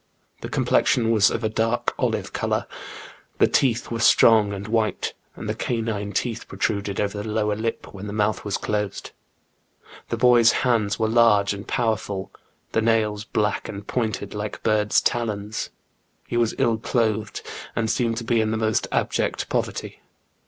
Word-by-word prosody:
The - - -6
complexion 115 -2 +2
was 105 -3 +5
of 115 - -3
a - - +2
dark 115 +2 0
olive - - -1
colour; - - -1 0.7
the - - +5
teeth 125 -4 +1
were 115 - -2
strong 110 -2 +5
and 100 +1 -5
white, 110 -1 0 0.2
and - - -7
the - - 0
canine 110 -4 -2
teeth 115 +3 -2
protruded 100 -2 -2
over 105 0 -1
the 110 - -5
lower 105 -1 0
lip 115 +1 -4
when 100 +1 -7
the - - -5
mouth 105 0 0
was 105 -2 -1
closed. 105 -2 -3 1.0
The - - -1
boy's 120 -2 +6
hands 110 -5 +2
were 110 - +1
large 110 -3 +4
and 100 +1 -8
powerful, 110 -5 -1 0.4
the 115 - +1
nails 110 -2 +1
black 105 -1 -1
and 100 0 -7
pointed 110 -5 -2
like 105 0 -5
bird's 105 -1 +3
talons. 110 -2 -2 0.6
He - - -4
was 120 -2 +1
ill 115 -1 +2
clothed, 110 -3 -1 0.3
and 115 - 0
seemed 115 0 0
to 115 - -3
be 115 0 +2
in 110 - 0
the 110 - -1
most 110 -1 0
abject - - -1
poverty. - - -3
110 Hz, 165 wpm, -23 LUFS, 105-115 Hz, 1.0 s, boy's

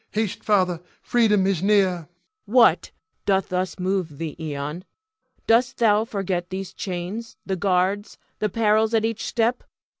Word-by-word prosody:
Haste, 215 -2 -2
Father, 185 -5 +2 0.2
freedom 210 -5 +3
is 190 -4 +1
near! 200 0 +4
Cleon. 175 -4 -5 0.4
What 240 +1 +4 0.4
doth 195 -1 +2
thus 185 0 -2
move 185 -5 -2
thee, 160 -1 -5 0.2
Ion? 150 +5 -5 0.6
Dost 240 +3 +3
thou 220 -2 +3
forget 190 -5 -3
these 190 0 -5
chains, 190 +5 -5
the 190 - -1
guards, 190 +2 0 0.2
the 215 - 0
perils 220 +1 +2
at 220 0 +2
each 225 0 -2
step? 235 +2 0
195 Hz, 145 wpm, -23 LUFS, 180-220 Hz, 0.6 s, near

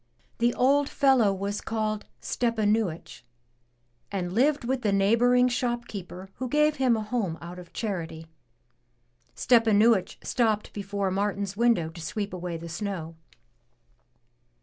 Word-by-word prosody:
The 240 +1 +2
old 280 +3 +3
fellow 265 -8 +4
was 200 +1 -3
called 215 -1 -2
Stepanuich, 215 - -1 0.9
and 180 -3 -3
lived 280 +5 +2
with 255 +1 -1
the 210 - +1
neighboring 235 +6 +4
shop 240 -1 -1
keeper 190 -1 -8
who 255 -1 -4
gave 300 +2 +2
him 255 -3 +3
a 215 - -3
home 210 -7 -2
out 175 +1 -9
of 175 - -13
charity. 165 -7 -4 1.1
Stepanuich 225 -4 +3
stopped 220 -4 0
before 200 -1 -2
Martin's 200 0 -2
window 230 -8 +2
to 170 +1 -10
sweep 200 +5 -4
away 175 -2 -4
the 165 +1 -8
snow. 165 -1 -5
210 Hz, 125 wpm, -27 LUFS, 190-240 Hz, 1.1 s, fellow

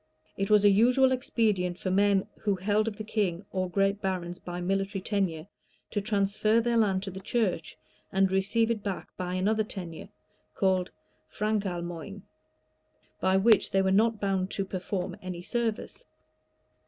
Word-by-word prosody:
It 195 0 -2
was 210 -1 +5
a - - +8
usual 250 +6 +4
expedient 210 -8 0
for 185 - -3
men 200 0 +3
who 205 -2 0
held 205 +4 +1
of 210 -2 -3
the 215 - -5
king 200 -4 -1
or 185 -1 -1
great 195 +2 +1
barons 180 -2 -3
by 175 0 -6
military 195 +2 -1
tenure, 185 -5 -1 0.5
to 205 - -1
transfer 210 +1 +2
their 235 0 0
land 195 -4 +2
to 195 - -5
the 190 - -7
church, 190 -5 -1 0.3
and 190 0 +2
receive 210 +4 +2
it 220 -2 -2
back 200 -2 -5
by 180 0 -3
another 215 +4 +1
tenure, 180 -6 -8 0.5
called 185 -2 +1 0.4
frankalmoigne, 195 -3 -3 1.0
by 190 0 +3
which 215 +2 +4
they 195 0 +2
were 190 - +2
not 220 +2 +3
bound 195 -2 0
to 195 - -2
per 190 -1 -4
form 180 0 -3
any 180 -1 -6
service. 235 - -3
195 Hz, 160 wpm, -28 LUFS, 185-215 Hz, 1.0 s, a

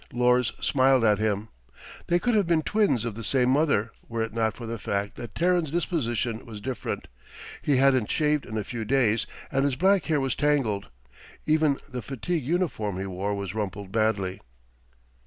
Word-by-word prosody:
Lors 125 0 +3
smiled 130 -2 +3
at 105 -2 +4
him. 110 0 -1 0.6
They 175 - +3
could 240 +7 0
have 205 -5 +3
been 165 -2 +2
twins 205 - +1
of 115 - -2
the 115 +2 -7
same 125 +2 +3
mother, 135 -7 +2 0.2
were 115 -1 -1
it 115 - -5
not 110 -2 0
for 120 - -7
the 115 0 -4
fact 100 0 -2
that 120 -3 -8
Terran's 175 -2 +2
disposition 120 -9 -1
was 110 -3 -9
different. 130 +4 -4 0.5
He 140 -3 +2
hadn't 130 -4 +3
shaved 150 -2 +1
in 110 - -4
a 105 - -1
few 115 +2 -5
days, 115 -2 +2 0.2
and 135 0 +1
his 140 -2 +1
black 190 +4 +3
hair 155 -2 +1
was 135 -2 0
tangled. 135 -9 +1 0.6
Even 155 -2 +3
the 125 -3 -5
fatigue 140 +6 -3
uniform 145 - -1
he 95 - -3
wore 95 +2 -2
was 100 -2 -4
rumpled 100 -2 -4
badly. 105 -4 0
125 Hz, 180 wpm, -26 LUFS, 110-150 Hz, 0.6 s, at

